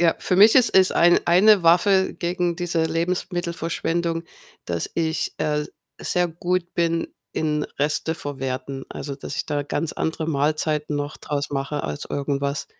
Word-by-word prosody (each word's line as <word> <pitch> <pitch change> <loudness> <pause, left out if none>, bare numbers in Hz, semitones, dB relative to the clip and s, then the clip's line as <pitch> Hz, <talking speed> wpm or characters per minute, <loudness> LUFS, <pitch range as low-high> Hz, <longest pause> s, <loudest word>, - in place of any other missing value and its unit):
ja, 170 -1 +4
für 180 - 0
mich 210 +4 +8
ist 255 -2 +5
es 190 -1 +6
ein 175 +1 +5
eine 190 +3 +6
Waffe 190 +3 +4
gegen 175 -1 -1
diese 170 -2 0
Lebensmittelverschwendung, 170 -1 -2 0.4
dass, 85 -1 -2
äh, - - +2
ich 160 - -2 0.7
sehr 180 -1 0
gut 175 +1 -2
bin 165 -1 0 0.2
in 150 -1 -1
Resteverwerten. 140 -3 -3
Also, 140 -1 -6
dass 140 +1 -7
ich - - -2
da 145 -1 -1
ganz 155 +2 -3
andere 160 0 -2
Mahlzeiten 150 0 0
noch 145 +1 -4
draus 145 -1 -3
mache 140 +1 -2
aus 75 - -4
irgendwas. 140 0 -2
165 Hz, 145 wpm, -23 LUFS, 145-175 Hz, 0.7 s, mich